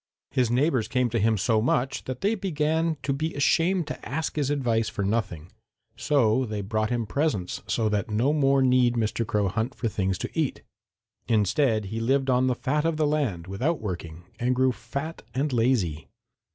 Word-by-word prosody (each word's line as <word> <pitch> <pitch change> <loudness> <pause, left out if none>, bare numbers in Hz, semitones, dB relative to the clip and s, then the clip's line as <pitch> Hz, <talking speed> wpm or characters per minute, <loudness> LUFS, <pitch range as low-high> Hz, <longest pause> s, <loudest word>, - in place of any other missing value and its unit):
His 130 -4 +1
neighbors 125 -1 +2
came 125 -2 0
to 115 - 0
him 110 +1 +2
so 110 +2 +2
much 125 +3 0
that 130 -1 -5
they 205 +3 +2
began 160 -4 0
to 140 0 0
be 155 +4 -3
ashamed 170 +5 +2
to - - -7
ask 155 +4 -3
his 145 -3 0
advice 120 -6 +1
for 100 - -3
nothing, 95 -6 -2 0.4
so 130 -4 +2
they 105 -4 -3
brought 110 +2 -1
him 120 -2 -1
presents 140 - -1
so 115 -2 +1
that 105 0 -1
no 115 +7 +2
more 135 -2 +3
need 125 -2 +3
Mr. 115 0 -1
Crow 105 -1 +1
hunt 115 +6 -2
for 120 - -2
things 95 -3 -1
to - - -4
eat. 160 -5 -1 0.6
Instead, 110 +1 +2
he 115 - -2
lived 135 +3 +1
on 125 +1 +3
the 125 - +1
fat 150 +4 0
of 165 -1 0
the 155 - +2
land 140 - -1
without 130 - -1
working, 85 -4 -6 0.2
and 125 +1 +1
grew 130 0 +3
fat 140 +7 -6
and 140 +1 0
lazy. 115 - +1
125 Hz, 190 wpm, -26 LUFS, 110-145 Hz, 0.6 s, more